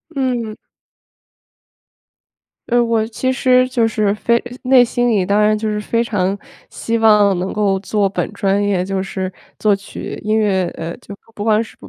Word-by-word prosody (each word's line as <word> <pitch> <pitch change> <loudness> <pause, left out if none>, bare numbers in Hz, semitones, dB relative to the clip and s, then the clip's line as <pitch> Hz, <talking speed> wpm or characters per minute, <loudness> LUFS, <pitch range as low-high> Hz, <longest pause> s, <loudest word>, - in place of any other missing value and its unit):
嗯。 245 -5 -2 2.1
呃， 240 0 +3
我 230 -2 +1
其 255 +3 -2
实 255 -1 +3
就 235 -3 +1
是 210 -2 0
非 235 +3 +1 0.2
内 255 -1 +6
心 245 0 0
里 205 -5 +2
当 205 +2 +2
然 215 0 +3
就 220 +1 -3
是 210 0 -2
非 230 +2 0
常 200 -4 -1 0.3
希 230 0 -2
望 210 -4 +4
能 185 +2 -3
够 200 -2 0
做 205 +1 0
本 195 - -3
专 200 +1 0
业， 190 -3 0
就 195 0 -2
是 190 -1 -4 0.3
作 210 -2 +2
曲， 195 - -8
音 215 +1 +1
乐。 190 -4 +1
呃， 165 +1 -5
就 200 +1 -11 0.2
不 205 - -6
管 220 0 +2
是， 225 - -14
210 Hz, 180 characters per minute, -18 LUFS, 195-230 Hz, 2.1 s, 内